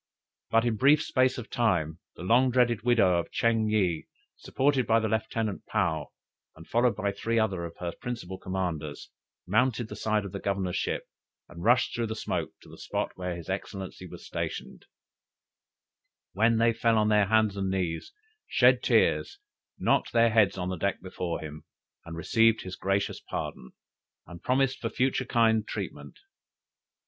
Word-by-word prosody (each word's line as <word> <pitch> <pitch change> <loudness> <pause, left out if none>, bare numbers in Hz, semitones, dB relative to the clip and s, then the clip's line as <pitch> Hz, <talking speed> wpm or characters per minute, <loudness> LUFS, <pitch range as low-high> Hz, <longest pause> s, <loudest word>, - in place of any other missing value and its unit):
But 115 +1 +3
in 115 -2 0
brief 140 +6 +5
space 130 0 +2
of 120 - -8
time, 85 -9 0 0.2
the - - -9
long 120 +7 +4
dreaded 120 -3 +2
widow 105 -7 +3
of 85 - -4
Ching 115 -2 +1
yih, 95 -7 0 0.3
supported 135 -2 0
by 115 0 +4
her 110 - -1
Lieutenant 110 -1 -2
Paou, - - 0 0.5
and 80 +1 -14
followed 120 +1 +2
by 100 +1 -1
three 115 +3 -2
other 100 -6 0
of 85 - -9
her 90 -1 -3
principal 105 -7 -5
commanders, 85 -6 -4 0.3
mounted 120 +3 +1
the - - -6
side 110 -1 0
of 100 - -6
the 100 - -5
governor's 95 -3 -2
ship, - - -1 0.4
and 85 0 -10
rushed 120 +1 +3
through 120 -1 -1
the 110 - -4
smoke - - -2
to - - -17
the - - -13
spot - - -2
where 90 -1 -4
his 85 -1 -9
excellency 95 -1 -5
was - - -11
stationed; - - -5 1.5
where 110 +4 +3
they 115 0 +3
fell 115 0 +2
on 105 0 +3
their 105 -2 +4
hands 110 -1 +3
and 95 -1 -2
knees, 90 - -2 0.4
shed - - +4
tears, - - +2 0.4
knocked - - +1
their 115 -1 +4
heads 105 -4 +3
on 90 0 -2
the 95 - -3
deck 100 +4 -1
before 90 -2 -4
him, 75 0 -8 0.4
and 85 -1 -7
received 115 +5 +3
his 95 -1 -6
gracious 100 +1 -1
pardon, 65 - -6 0.5
and 85 -1 -11
promised 135 +1 +1
for 115 - -2
future 130 +1 0
kind 110 -2 +2
treatment. - - -6
110 Hz, 170 wpm, -28 LUFS, 95-115 Hz, 1.5 s, brief